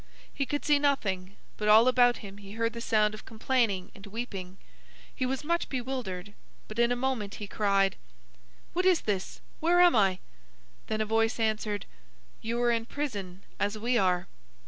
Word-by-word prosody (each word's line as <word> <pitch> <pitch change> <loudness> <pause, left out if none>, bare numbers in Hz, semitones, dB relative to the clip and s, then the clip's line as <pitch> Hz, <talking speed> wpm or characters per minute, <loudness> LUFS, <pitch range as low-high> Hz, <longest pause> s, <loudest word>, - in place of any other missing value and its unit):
He 275 - -2
could 290 - -2
see 295 -1 +4
nothing, 200 -10 0 0.2
but 210 - -2
all 220 +3 +7
about 245 -1 +5
him 200 0 -10
he 200 0 -10
heard 230 +1 -1
the 235 - -6
sound 215 -2 +2
of 215 - -9
complaining 225 -4 0
and 200 +1 -12
weeping. 195 -4 -6 0.6
He 255 - -1
was 265 +2 -2
much 340 +3 0
bewildered, 235 -8 -4 0.3
but 215 +2 -6
in 235 0 +4
a - - +2
moment 245 -5 -2
he 210 - -6
cried: 195 -1 +1 0.8
"What 365 +2 +2
is 365 -3 +4
this? 195 -3 -3 0.2
Where 345 +2 +3
am 355 -5 +7
I?" 195 -4 +3 0.7
Then 220 0 -1
a - - +1
voice 225 +2 +1
answered: 215 -2 -1 0.6
"You 230 +2 -2
are 240 - +4
in 230 -1 -1
prison, 200 -11 -5 0.2
as 205 +1 0
we 240 +3 0
are." 180 -4 +2
225 Hz, 175 wpm, -29 LUFS, 200-255 Hz, 0.8 s, all